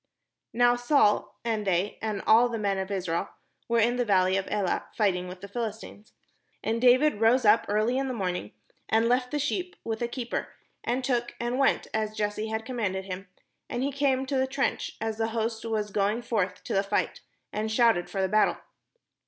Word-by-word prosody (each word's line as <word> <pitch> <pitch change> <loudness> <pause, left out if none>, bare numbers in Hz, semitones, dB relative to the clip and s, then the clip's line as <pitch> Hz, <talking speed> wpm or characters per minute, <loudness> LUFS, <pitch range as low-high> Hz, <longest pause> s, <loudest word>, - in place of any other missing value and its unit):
Now 245 +1 +4
Saul, 245 -4 +2
and 220 -3 -1
the}^, 190 +2 0
and 215 -2 -3
all 235 +3 +6
the 235 - -3
men 200 -2 0
of 190 0 -3
Israel, 185 -2 -2 0.4
were 235 - +1
in 235 +2 +3
the 245 - +2
valley 190 -4 +3
of 195 0 -1
Elah, 205 -3 -1
fighting 180 -5 +1
\\'ith 180 0 -10
the 200 - -7
Philistines. 220 -1 -6 0.5
And 225 +1 -1
David 255 -1 +4
rose 230 +2 +4
up 215 +2 +5
early 215 +5 +1
in 270 - -1
the 260 - -2
morning, 180 - -3 0.4
and 225 +2 +3
left 250 +1 +2
the 295 - -2
sheep 355 +6 -2
^^ith 225 0 -3
a 240 - +1
keeper, 240 0 -4 0.3
and 250 +2 -1
took, 245 -2 -1
and 240 +2 -1
went, 275 - +3
as 215 -1 -1
Jesse 210 +1 -1
had 220 0 -3
commanded 205 -7 -2
him; 190 +1 -6 0.4
and 245 +1 -2
he 280 - 0
came 270 -1 +1
to 270 0 -1
the 260 0 +2
trench, 270 +1 -2
as 225 0 -3
the 225 - +1
host 225 0 -1
was 215 -2 -2
going 210 +4 0
forth 195 -6 -1
to - - -4
the 195 - +3
fight, 200 +1 -1 0.3
and 215 +1 -2
shouted 220 -6 +3
for 195 -1 -1
the - - +2
battle. 215 +3 +3
220 Hz, 200 wpm, -27 LUFS, 200-245 Hz, 0.5 s, all